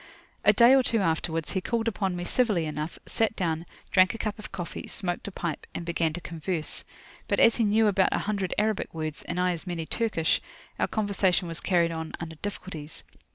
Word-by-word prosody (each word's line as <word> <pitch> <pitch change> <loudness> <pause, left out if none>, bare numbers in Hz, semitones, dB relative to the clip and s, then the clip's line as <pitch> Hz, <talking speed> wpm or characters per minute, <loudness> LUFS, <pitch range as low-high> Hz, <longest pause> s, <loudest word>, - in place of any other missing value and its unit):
A - - +7
day 240 +2 +7
or 270 - +7
two 235 -2 +1
afterwards, 165 -2 0
he 190 - -1
called 230 +3 -1
upon 190 -3 0
me 175 - -3
civilly 210 -7 +2
enough, 150 +1 -4
sat 225 -1 0
down, 165 -2 -1 0.2
drank 185 +2 +5
a - - -4
cup 215 -1 -3
of 215 - -8
coffee, 180 -3 -5
smoked 175 0 -2
a - - -4
pipe, 170 -4 -4
and 170 - -4
began 170 -1 +1
to 175 - -4
converse. 165 -1 -3 0.4
But - - +1
as 230 - +6
he 230 - +3
knew 215 +2 +4
about 195 -2 +4
a - - +2
hundred 200 -3 -1
Arabic 215 -4 0
words, 155 -1 -4
and 175 +1 -3
I 180 0 +3
as 175 +1 -4
many 170 -2 -3
Turkish, 210 -6 +1 0.4
our - - +2
conversation 200 -4 +1
was 165 0 -3
carried 170 -3 +2
on 160 -1 -5
under 160 -1 -6
difficulties. 165 -5 -6
180 Hz, 205 wpm, -27 LUFS, 165-210 Hz, 0.4 s, A